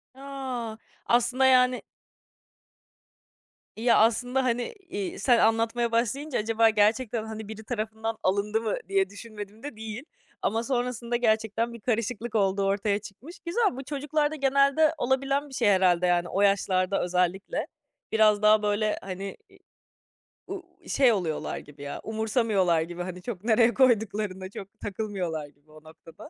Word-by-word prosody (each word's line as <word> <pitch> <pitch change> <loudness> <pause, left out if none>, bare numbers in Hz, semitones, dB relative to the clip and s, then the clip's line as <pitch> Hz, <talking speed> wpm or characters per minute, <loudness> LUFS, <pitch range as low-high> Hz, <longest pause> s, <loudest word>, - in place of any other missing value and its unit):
A. 260 -5 -5 0.3
Aslında 245 +2 +3
yani 250 -1 +4 1.9
Ya, 235 +1 +4
aslında 245 +4 +2
hani, 245 - -1 0.2
iii, 200 -2 -4
sen 240 +2 +4
anlatmaya 230 +1 +2
başlayınca 250 +5 0
acaba 225 +1 +3
gerçekten, 220 +2 +1
hani, 220 -1 -7
biri 220 0 -8
tarafından 220 -1 -3
alındı 205 +3 +1
mı 220 -2 -1
diye 195 -1 +2
düşünmedim 210 +1 -10
de 290 -6 -6
değil. 220 +3 -7 0.4
Ama 225 +2 0
sonrasında 245 -2 -2
gerçekten 225 0 +1
bir 235 - -9
karışıklık 230 0 -2
olduğu 195 -1 +2
ortaya 200 +1 +1
çıkmış. 235 - -12
Güzel, 410 +5 +2
bu 270 - -5
çocuklarda 295 +2 -1
genelde 280 +3 +3
olabilen 275 +2 0
bir - - -13
şey 240 -4 +1
herhâlde 180 -2 +3
yani 175 0 +2
o 195 - 0
yaşlarda 195 -1 +2
özellikle. 180 +2 -1 0.4
Biraz 215 -1 +4
daha, 215 0 +5
böyle, 210 +1 +1
hani 195 +1 -6
i 390 - -20 0.9
u 385 -2 -6 0.2
şey 260 -4 +4
oluyorlar 170 -6 -2
gibi 145 -1 -12
ya 140 - -5
umursamıyorlar 215 -6 +1
gibi 175 +2 -5
hani 180 0 -7
çok 200 -2 -6
nereye 230 +1 +4
koyduklarına 210 -6 +1
çok 195 0 -10
takılmıyorlar 185 -7 -4
gibi 145 +2 -25
o 155 0 -16
noktada. 165 - -14
220 Hz, 140 wpm, -27 LUFS, 195-245 Hz, 1.9 s, daha